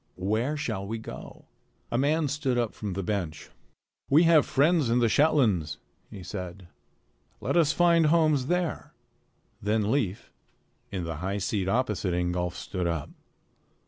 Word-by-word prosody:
Where 110 +10 -1
shall 100 -9 -3
we 115 +2 -3
go?" 110 - -10 0.5
A 120 - +1
man 150 +3 +2
stood 135 -3 -1
up 120 -3 0
from 105 -3 -5
the 95 +1 -3
bench. 90 -6 -4 0.6
"We 150 +5 +6
have 165 -3 +5
friends 150 -1 +3
in 120 - +3
the 120 -1 +3
Shetlands," 110 - +2 0.3
he 95 - -9
said. 90 +1 -7 0.7
"Let - - -2
us 165 -3 +4
find 170 -1 +4
homes 155 -5 +3
there." 175 -1 -2 0.7
Then 105 +1 +1
Leif, 110 -9 -1 0.6
in 95 -3 -3
the 80 -2 -4
high 95 +5 -2
seat 95 -1 -1
opposite 105 -6 0
Ingolf, 90 0 -1
stood 90 0 -3
up. 85 -4 -3
110 Hz, 145 wpm, -27 LUFS, 90-150 Hz, 0.7 s, We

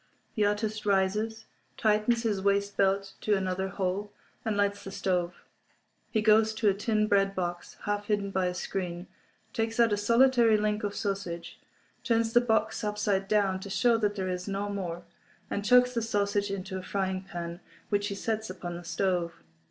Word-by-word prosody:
The 215 -3 +2
artist 210 +1 -1
rises, 210 +3 0 0.3
tightens 220 +2 +2
his 210 -4 0
waist 200 +1 +1
belt 195 0 +1
to 210 - +2
another 190 0 -1
hole, 195 +2 -2 0.3
and 215 -2 -1
lights 200 0 +1
the - - -6
stove. 180 -2 -2 0.7
He 220 - 0
goes 220 0 +4
to 220 0 +1
a - - +3
tin 215 +2 +1
bread 195 -1 +2
box, 175 -1 -4
half 205 0 -2
hidden 205 -2 0
by 190 -1 +1
a 180 - -2
screen, 180 -1 -4 0.5
takes 225 +1 -1
out 230 -2 +5
a - - +1
solitary 235 +1 +4
link 210 0 0
of 205 0 -2
sausage, 195 -4 -4 0.4
turns 230 -2 +1
the 240 - +6
box 220 -2 +1
upside 205 -2 0
down 195 -2 +2
to 200 - -8
show 235 +4 +3
that 210 -2 0
there 190 -2 -2
is 180 +1 -3
no 200 +1 -2
more, 175 -4 -4 0.5
and 200 - -1
chucks 250 +3 +5
the 235 - 0
sausage 205 -2 0
into 190 -1 -4
a - - -9
frying 190 -1 -1
pan, 175 -3 -6 0.3
which 205 -1 +1
he 200 - -4
sets 220 +1 -2
upon 175 -2 -6
the 175 - -9
stove. 175 - -1
200 Hz, 180 wpm, -29 LUFS, 190-215 Hz, 0.7 s, the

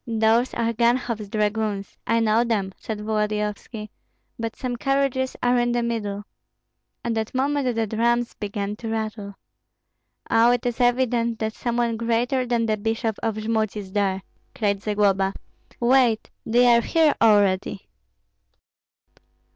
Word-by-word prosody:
"Those 225 +2 +2
are 230 0 0
Ganhoff's 235 -2 0
dragoons, 210 -1 -1
I 230 0 +2
know 225 +1 +3
them," 205 -5 -1
said 215 -2 -6
Volodyovski; 210 0 -2 0.5
"but 230 0 -3
some 250 -1 -3
carriages 270 0 0
are 245 0 +3
in 240 0 +1
the 240 0 0
middle!" 205 -3 -3 0.8
At 235 - 0
that 220 +2 -3
moment 270 -2 0
the 225 0 +1
drums 235 +2 0
began 205 0 -4
to 230 - -7
rattle. 215 -2 -4 0.9
"Oh, 230 +1 +4
it 245 - -2
is 245 0 -1
evident 245 -2 +2
that 220 0 -2
some 240 0 -3
one 235 -2 +1
greater 240 +3 0
than 235 -1 +1
the 215 -1 0
bishop 225 +1 -1
of 225 -2 -1
Jmud 220 -1 -1
is 195 -2 -7
there!" 195 -2 0 0.3
cried 200 -3 0
Zagloba. 200 -2 +1 0.4
"Wait, 240 -2 +3 0.2
they 240 +2 +4
are 235 - +4
here 315 +4 +3
already." 205 -4 +3
225 Hz, 140 wpm, -23 LUFS, 210-240 Hz, 0.9 s, Oh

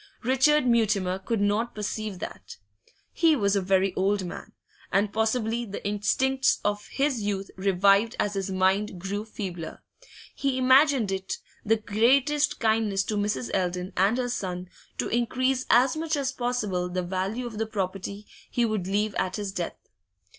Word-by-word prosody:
Richard 265 +4 +4
Mutimer 210 -6 +2
could 210 +2 -2
not 210 +4 0
perceive 210 -1 -4
that. - - -8 0.6
He 325 -2 +4
was 200 -5 +1
a 200 - +2
very 190 0 +2
old 195 +1 +1
man, 175 - -8 0.4
and 200 +2 +1
possibly 225 +1 0
the 200 -2 -5
instincts 260 +6 +1
of 205 0 -1
his 275 -4 0
youth 200 -1 -3
revived 195 +3 +3
as 205 - 0
his 195 -1 -2
mind 190 +1 +1
grew 200 +3 -3
feebler; 185 -7 -6 0.5
he 275 -2 -1
imagined 260 -3 +4
it 190 0 -3 0.3
the 220 +1 +3
greatest 265 +8 +2
kindness 220 -3 +2
to 215 - -3
Mrs. 205 - -1
Eldon 180 0 -1
and 195 +6 +3
her 250 -1 -1
son 180 -5 -4 0.3
to - - -1
increase 255 +2 0
as 255 +4 +5
much 320 0 -1
as 275 -2 -1
possible 220 -9 -1
the 180 0 -2
value 190 +7 -2
of 225 -3 -6
the 225 - -1
property 200 0 -4 0.2
he 240 - +1
would 215 -5 -2
leave 205 +2 0
at 185 0 -1
his 205 -2 -3
death. 180 -3 -4
210 Hz, 160 wpm, -26 LUFS, 195-240 Hz, 0.6 s, as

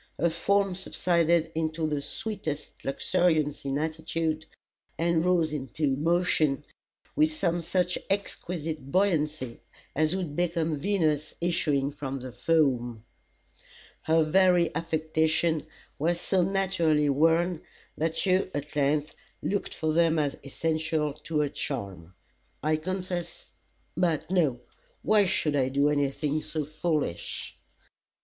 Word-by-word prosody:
Her 170 +2 +2
form 195 +3 +2
subsided 170 -3 +1
into 160 0 -1
the 150 -2 -1
sweetest 155 -5 -5
luxuriance 155 0 +1
of 135 0 0
attitude, 160 0 -2 0.5
and 165 -1 +2
rose 170 -4 +2
into 135 0 -1
motion 155 -2 +2 0.5
with 310 +1 +4
some 175 - 0
such 180 +1 0
exquisite 165 -7 -3
buoyancy, 155 -9 +1 0.4
as 155 +4 +2
would 175 -6 -3
become 165 -3 0
Venus 155 -5 0
issuing 150 -5 +1
from 135 -2 -5
the 130 0 -7
foam. 120 -7 +1 1.0
Her 160 0 +3
very 175 0 +4
affectations 160 0 +1 0.3
were 170 +4 +2
so 180 +2 +1
naturally 175 -5 +2
worn, 165 +4 +3 0.3
that 160 +4 -1
you 185 0 +2
at 145 +1 -5
length 145 +1 +1 0.3
looked 200 0 -2
for 155 -1 0
them 165 0 +3
as 145 -2 +1
essential 155 +1 -1
to 155 +1 -2
her 145 - 0
charm. 95 - -5 0.5
I 155 +1 +2
confess 180 +1 -5 0.4
but 170 -1 0
no! 150 -10 +2 0.4
Why 210 -2 +4
should 155 -5 +1
I 130 -2 +2
do 140 +2 +3
anything 145 +1 0
so 155 -1 -3
foolish? 155 - -2
160 Hz, 120 wpm, -28 LUFS, 145-175 Hz, 1.0 s, with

